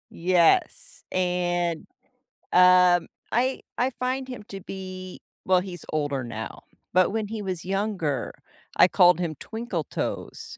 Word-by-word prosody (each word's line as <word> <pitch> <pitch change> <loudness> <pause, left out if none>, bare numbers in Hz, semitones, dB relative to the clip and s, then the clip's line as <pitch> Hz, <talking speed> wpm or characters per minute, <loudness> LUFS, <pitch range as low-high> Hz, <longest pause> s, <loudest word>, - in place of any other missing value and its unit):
Yes, 185 - +2
and, 175 -2 0 0.7
um, 180 -1 +6 0.2
I 255 +3 +1 0.2
I 250 +2 +2
find 255 +1 -1
him 250 -4 -7
to 195 -1 -7
be 185 -1 -8 0.3
well, 185 -1 +4
he's 180 -3 -8
older 145 -4 -1
now, 110 -2 -7 0.3
but 185 0 +4
when 220 0 -2
he 220 0 -5
was 185 -3 -4
younger, 190 - -2 0.4
I - - +8
called 180 -2 +5
him 165 -3 -2
Twinkle 220 -7 -4
Toes, - - -5
185 Hz, 130 wpm, -25 LUFS, 175-210 Hz, 0.7 s, I